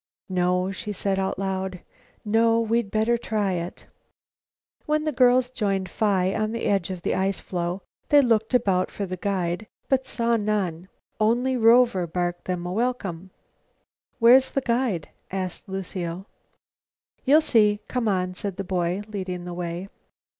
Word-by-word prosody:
"No," 180 0 +1
she 200 +2 -5
said 195 0 -1
out 190 - -1
loud, 190 -1 -3 0.4
"no, 225 +2 +3
we'd 230 -1 0
better 220 +3 +1
try 210 -4 -1
it." 175 -1 -5 1.0
When 305 0 +1
the 310 - 0
girls 250 -1 +4
joined 195 -6 -1
Phi 195 -3 +1
on 215 0 -1
the 230 - -3
edge 195 -3 +1
of 180 -3 -6
the - - 0
ice 195 +1 0
floe, 175 +1 -3 0.3
they 290 - +7
looked 225 0 +2
about 195 -6 +2
for 200 - -4
the 185 -1 -4
guide 185 +1 -2 0.2
but 265 -1 +1
saw 235 -1 +1
none. 195 -5 -1 0.3
Only 240 +4 +2
Rover 230 -5 +4
barked 175 +1 -2
them 180 -1 -3
a 180 - -3
welcome. 195 -6 -2 0.9
"Where's 255 +3 +6
the 275 - -1
guide?" 235 - -1 0.2
asked 185 -1 -4
Lucile. 185 -1 -4 1.0
"You'll 295 +4 +5
see. 210 -7 +3
C'm'on," 195 -7 0
said 190 0 -5
the 195 - -2
boy, 180 +1 -1
leading 185 -4 -4
the 175 - -5
way. 175 +1 -4
195 Hz, 150 wpm, -25 LUFS, 180-230 Hz, 1.0 s, they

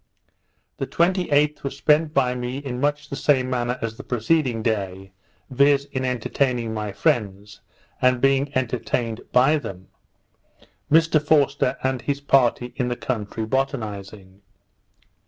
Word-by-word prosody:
The - - -3
28th 170 -4 +1
was 140 - -5
spent 150 +1 +3
by 130 -4 +2
me 125 +1 -4
in 130 -3 -5
much 145 +1 0
the - - -2
same 130 -3 +1
manner 125 0 -1
as 115 -1 -4
the 135 - -8
preceding 125 -1 0
day, 95 -4 -2 0.4
viz. 140 +1 +3
in 130 -1 -2
entertaining 125 -1 -1
my 105 -1 -3
friends, 105 -7 -1 0.4
and 125 -1 +3
being 135 +2 +2
entertained 120 -2 -2
by 135 +5 +4
them. 95 -8 -9 1.0
Mr 160 -1 +4
Forster 140 -3 +2
and 130 -2 -1
his 140 +2 -2
party 125 -3 +2
in 125 - 0
the 120 - -1
country 110 -3 -4
botanizing. 105 -6 -4
130 Hz, 135 wpm, -23 LUFS, 115-140 Hz, 1.0 s, by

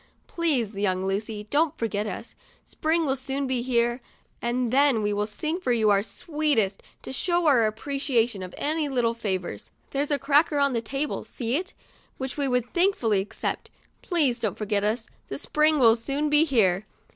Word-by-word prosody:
Please, 265 - 0
young 190 -2 0
Lucy, 210 +2 -2
don't 305 +1 +2
forget 215 -2 -2
us; 210 +4 -6 0.3
Spring 320 +1 0
will 265 -2 +1
soon 270 +1 -3
be 260 -2 0
here, 240 0 +1 0.4
and 240 0 -1
then 275 -5 +4
we'll 205 0 0
sing 310 - -3
for 305 -9 -1
you 220 -3 +3
our 200 -1 +4
sweetest, 275 - -1 0.2
to - - -7
show 345 +5 +1
our 250 -7 +5
appreciation 235 -2 -1
of 185 -1 -7
any 305 0 -1
little 240 -3 +1
favors. 185 - -4 0.2
There's 280 +1 -1
a 290 - +2
cracker 290 +2 +3
on 280 -1 +2
that 230 -1 -2
table, 275 +4 -2
see 240 0 -3
it? 365 +4 -3 0.4
which 265 -1 -4
we 285 -2 0
would 250 -2 +1
thankfully 255 - +2
accept. 195 - -4 0.3
Please 290 -9 +1
don't 215 -5 -2
forget 205 -1 -1
us, 220 +2 -1 0.2
the 135 - -5
Spring 305 - +2
will 230 -5 +6
soon 280 +5 -2
be 300 +2 +6
here." 215 - +2
245 Hz, 175 wpm, -26 LUFS, 215-290 Hz, 0.4 s, will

